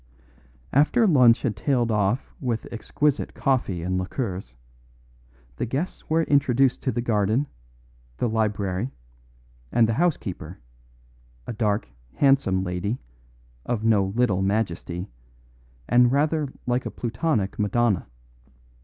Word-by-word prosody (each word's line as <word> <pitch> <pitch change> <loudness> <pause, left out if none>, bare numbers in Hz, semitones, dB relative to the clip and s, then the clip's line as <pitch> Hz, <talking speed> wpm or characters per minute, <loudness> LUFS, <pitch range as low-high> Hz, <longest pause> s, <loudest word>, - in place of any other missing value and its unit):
After 155 - +4
lunch 125 - +5
had 115 -6 0
tailed 120 +2 +1
off 105 +4 0
with 120 -4 -2
exquisite 145 +5 -1
coffee 120 - 0
and 95 +1 -1
liqueurs, 95 - -4 1.0
the - - -2
guests 140 +10 -4
were 165 +1 +3
introduced 135 -3 +2
to 130 - 0
the 120 - -2
garden, 110 +3 +1 0.7
the - - 0
library, 105 -1 -1 0.8
and 115 -2 +4
the 115 - 0
housekeeper 110 - -1 0.9
a - - -5
dark, 105 - 0 0.3
handsome 135 -10 +3
lady, 90 +5 -2 0.7
of 115 -3 -2
no 110 -3 +4
little 100 -1 +1
majesty, 95 -3 -1 0.8
and 120 0 +5
rather 150 0 +1
like 125 0 0
a - - -3
plutonic 120 - -2
Madonna. 105 -2 +1
115 Hz, 115 wpm, -25 LUFS, 100-135 Hz, 1.0 s, lunch